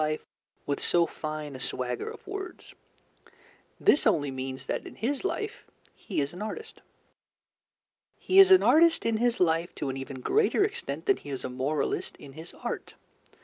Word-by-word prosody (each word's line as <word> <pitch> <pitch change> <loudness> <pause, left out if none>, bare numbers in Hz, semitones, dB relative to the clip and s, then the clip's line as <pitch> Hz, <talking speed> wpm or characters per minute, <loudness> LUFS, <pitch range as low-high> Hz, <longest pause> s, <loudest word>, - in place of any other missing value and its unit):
life 155 0 -2 0.4
with 140 -1 -1
so 170 -1 +3
fine 155 -3 -6
a - - -7
swagger 125 -1 -3
of - - -11
words. 390 -2 -7 1.1
This 285 - +4
only 145 -10 +2
means 130 0 -5
that - - -3
in - - -11
his 270 +7 -2
life 420 +2 -3 0.3
he - - -4
is 140 +2 -1
an 180 - -8
artist. 445 - -6 1.4
He 380 - +3
is 385 -1 +10
an 375 -1 +7
artist 330 +1 +5
in 230 -1 +2
his 240 +1 +1
life 170 0 +1
to 140 - -3
an 135 - -3
even 135 -1 -7
greater 420 - +3
extent 410 0 -3
than 400 -2 +3
he - - -11
is 135 -2 -5
a - - -3
moralist 135 +4 -2
in 140 - -12
his 160 +4 -10
art. - - -5
165 Hz, 175 wpm, -28 LUFS, -, 1.4 s, is